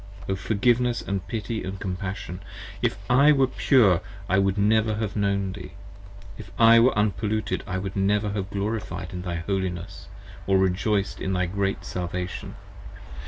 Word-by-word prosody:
Forgiveness 120 +5 +1
& 90 -1 -9
Pity 110 +2 -3
& 95 - -8
Compassion! 95 -1 -4 0.4
If - - 0
I 140 +4 +6
were 135 -2 +4
Pure 120 - +3 0.3
I 95 - +2
should 95 +1 +1
never 110 +1 +3
45 - - -3
Have 105 -3 -3
known 100 -2 0
Thee: 95 -1 -9 0.7
If - - -9
I 115 0 +7
were 120 -1 +4
Unpolluted 105 -1 0
I 95 -1 -2
should 95 0 -5
never 105 +1 +1
have 100 -1 -3
Glorified 100 -2 -3
thy 90 -1 -4
Holiness, 90 0 -3 0.4
or 95 0 +4
rejoiced 95 +2 0
in 95 - -1
thy 90 0 +1
great 95 +2 -2
Salvation. 90 0 -4
100 Hz, 150 wpm, -25 LUFS, 95-110 Hz, 0.7 s, I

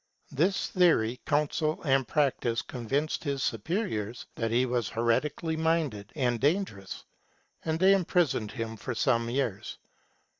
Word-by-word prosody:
This 175 +8 +1
theory, 135 - +3
counsel, 155 +1 +1
and 135 -4 +2
practice 125 -5 +1
convinced 135 +5 -2
his 140 -3 -2
superiors 115 - -2
that 115 -1 -2
lie 125 +2 +3
was 120 -2 -1
heretically 140 +8 0
minded 160 -11 0
and 120 -5 0
dangerous, 145 - -1 0.6
and 160 0 0
they 190 +2 +6
imprisoned 175 - +1
him 115 -1 -4
for 125 +3 -5
some 115 -1 +1
years. 120 -6 -2
135 Hz, 125 wpm, -29 LUFS, 115-160 Hz, 0.6 s, they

